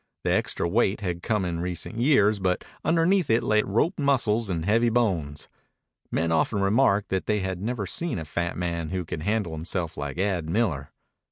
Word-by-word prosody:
The - - +1
extra - - +1
weight 105 +2 +1
had 90 -3 -3
come 105 -2 0
in 85 -2 -3
recent 90 +6 -4
years, 110 -6 +4
but 90 -1 -1 0.2
underneath 170 +1 +2
it 115 +1 +3
lay 105 0 +3
roped 115 - 0
muscles 120 -6 +2
and 85 -3 -2
heavy 115 +4 +3
bones. 90 -12 -1 0.6
Men 80 0 0
often 80 +6 +1
remarked 100 0 +2
that 95 -1 -2
they 105 -1 +1
had 95 -1 -3
never 115 -1 -2
seen 170 - -1
a 80 - -5
fat 85 +3 -3
man 85 -2 -2
who 90 -1 -3
could 80 - -5
handle 105 -1 -1
himself 80 +1 -4
like 70 +1 -5
Ad 90 -4 -1
Miller. 80 -9 0
95 Hz, 185 wpm, -26 LUFS, 85-115 Hz, 0.6 s, years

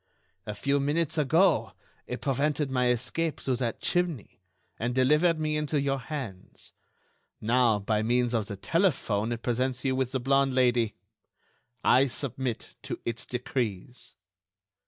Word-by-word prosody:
A 105 - -4
few 140 +6 +1
minutes 150 +3 0
ago, 160 +7 +3 0.3
it 125 - -5
prevented 145 +1 0
my 125 -1 +2
escape 135 +6 -1
through 130 -2 -1
that 120 -2 -2
chimney, 170 - -1 0.4
and 120 +2 -1
delivered 150 +6 +3
me 155 0 0
into 150 0 0
your 135 -1 0
hands. 125 -9 -7 0.7
Now, 115 -1 +3
by 105 +1 0
means 120 +2 +1
of 110 -3 0
the 100 - -6
telephone, 120 - +1
it 115 -1 -4
presents 130 +2 -1
you 130 -1 +2
with 130 -1 0
the 130 - -1
blonde 135 +1 +2
Lady. 120 -4 +2 0.9
I 135 +2 +5
submit 130 -2 -4
to - - -5
its 115 0 -3
decrees." 125 -2 -4
130 Hz, 140 wpm, -28 LUFS, 120-145 Hz, 0.9 s, I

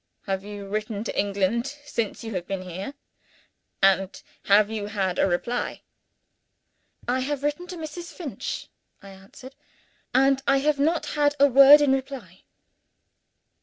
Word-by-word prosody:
"Have 195 -1 -3
you 205 -1 -8
written 215 +1 -3
to - - -5
England 200 +4 0 0.2
since 230 -5 -3
you 225 -1 -6
have 180 -2 -4
been 195 -1 -4
here? 185 +9 -7 0.9
and 195 0 +3 0.3
have 205 +1 +4
you 210 -2 -3
had 195 -3 -2
a - - +4
reply?" 235 +7 -2 1.2
"I 250 +2 +1
have 280 +1 -3
written 295 +5 -2
to 360 -1 -7
Mrs. 325 +2 -7
Finch," 310 -8 -6 0.4
I 200 - -11
answered; 195 +7 -13 0.6
"and 270 +1 +3
I 275 - +4
have 285 +1 +1
not 320 +4 +1
had 290 -1 +2
a 280 - +7
word 275 +2 +8
in 290 -2 +3
reply." 260 -9 -5
235 Hz, 145 wpm, -25 LUFS, 195-280 Hz, 1.2 s, word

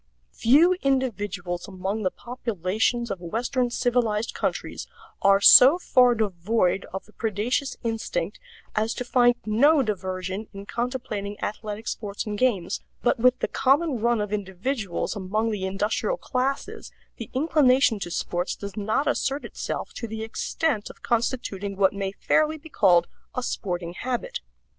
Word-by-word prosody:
Few 300 +10 +5
individuals 205 -10 -1
among 195 +2 -3
the 185 - +1
populations 230 +1 -2
of 195 - -3
Western 240 +8 -1
civilized 235 -3 0
countries - - -3 0.3
are 195 0 +5
so 260 +9 +9
far 250 -8 +4
devoid 195 -1 0
of 190 - -6
the 215 - -21
predaceous 230 +5 -1
instinct 230 - -3 0.4
as 220 +2 0
to 250 - -4
find 245 -1 +4
no 275 +7 +4
diversion 190 -1 -3
in 195 0 -8
contemplating 235 -4 -4
athletic 215 +1 -5
sports 205 -2 -4
and 210 -1 -3
games, 205 -7 0 0.2
but 245 0 +2
with 250 +2 +4
the - - +1
common 275 0 +2
run 235 +1 +2
of 210 0 -3
individuals 200 +1 -3
among 210 +3 -1
the 190 -3 -2
industrial 210 - -1
classes 270 - -3 0.3
the 230 - -7
inclination 265 -5 +3
to 185 - -5
sports 175 +2 -2
does 200 -1 -8
not 220 +7 0
assert 275 0 -1
itself - - -5
to 230 - -5
the 220 0 -5
extent 225 +1 -2
of - - -15
constituting 225 -4 -1
what 195 -1 +3
may 195 -1 -3
fairly 310 +9 +1
be 320 +1 -13
called 180 - +4 0.3
a 250 - -2
sporting 175 -6 -3
habit. 255 - -3
220 Hz, 145 wpm, -25 LUFS, 195-255 Hz, 0.4 s, so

